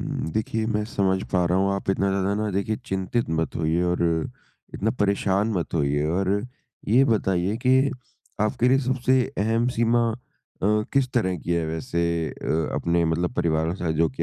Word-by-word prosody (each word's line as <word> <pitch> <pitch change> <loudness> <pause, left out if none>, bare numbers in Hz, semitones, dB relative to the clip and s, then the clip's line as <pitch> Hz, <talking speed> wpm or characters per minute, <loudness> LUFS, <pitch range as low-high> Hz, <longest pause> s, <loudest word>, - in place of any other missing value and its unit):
उम, - - -3
देखिए 110 0 -1
मैं 105 -2 0
समझ 95 -3 0
पा 90 -1 +3
रहा 90 +2 +2
हूँ। 100 0 +2
आप 100 0 -2
इतना 100 0 +1
ज़्यादा 100 +1 0
ना 105 - -1
देखिए 100 +3 -1
चिंतित 95 +4 -1
मत 80 0 -1
होइए 80 +2 +1
और 90 0 0 0.7
इतना 110 +3 0
परेशान 100 +1 +1
मत 90 -3 -2
होइए 75 -1 +1
और 90 +4 0 0.6
ये 125 +5 +5
बताइए 95 -3 +1
के 130 +1 +6 0.7
आपके 120 +3 +1
लिए 135 +1 +4
सबसे 130 0 +2 0.2
अहम 115 +3 +1
सीमा 115 0 +3 0.5
अ, - - +2 0.3
किस 135 -2 +2
तरह 95 -7 +1
की 85 - -3
है 85 -1 +1
वैसे 80 +1 -3 0.3
अ 80 0 -2
अपने 85 0 +1
मतलब 85 +2 0
परिवार 80 -2 +1
के - - -2
साथ 80 -2 -1
जो 80 -1 +4
कि 65 - -4
95 Hz, 180 wpm, -24 LUFS, 85-110 Hz, 0.7 s, के